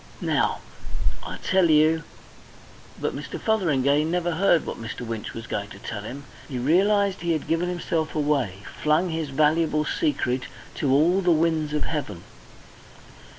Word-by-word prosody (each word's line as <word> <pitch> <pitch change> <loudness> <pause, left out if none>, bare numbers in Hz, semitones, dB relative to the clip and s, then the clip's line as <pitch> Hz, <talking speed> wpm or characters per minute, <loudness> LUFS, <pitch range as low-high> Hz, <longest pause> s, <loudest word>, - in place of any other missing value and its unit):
Now, - - 0 0.6
I - - -6
tell 185 -3 +3
you 155 +1 +4 0.5
" - - -22
But - - -2
Mr. - - -6
Fotheringay 150 - +2
never 175 +2 0
heard 170 -1 +3
what - - -6
Mr. 110 +1 -6
Winch 115 -3 -5
was 115 0 -6
going 100 -2 -4
to - - -11
tell 105 +1 -6
him. 135 +7 -8 0.2
He 130 - -4
realised 195 +9 +2
he 170 -1 +1
had 155 - -3
given 165 +2 +1
himself 165 -2 -2
away, 135 -11 0 0.2
flung 155 +4 +2
his 160 -2 -2
valuable 150 +2 +2
secret 130 - 0 0.3
to 140 - +1
all 165 +8 +4
the 180 - +1
winds 160 -2 +2
of 150 - 0
heaven. 115 - -4
155 Hz, 155 wpm, -25 LUFS, 135-170 Hz, 0.6 s, you